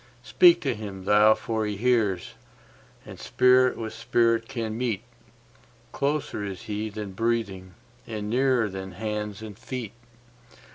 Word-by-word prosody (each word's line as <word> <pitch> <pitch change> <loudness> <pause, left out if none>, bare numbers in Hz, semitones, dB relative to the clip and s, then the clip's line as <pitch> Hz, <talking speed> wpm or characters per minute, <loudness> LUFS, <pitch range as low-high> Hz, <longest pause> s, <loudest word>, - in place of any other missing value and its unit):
Speak 175 +6 +5
to 140 - 0
Him 100 -3 -8
thou 105 +2 +6
for 110 -2 -2
He 105 -1 -3
hears, 110 -6 +1 0.7
and - - -11
Spirit 125 - +3
with 110 -1 -5
Spirit 115 -1 +1
can 115 -5 -4
meet—Closer 120 +3 -5
is 100 0 -6
He 110 -1 -3
than 105 -1 -6
breathing, 100 -4 -2 0.3
and 105 -2 -5
nearer 125 0 +2
than 95 -1 -7
hands 105 +1 -4
and 105 -2 -8
feet. 120 -2 -6
110 Hz, 130 wpm, -26 LUFS, 105-120 Hz, 0.7 s, thou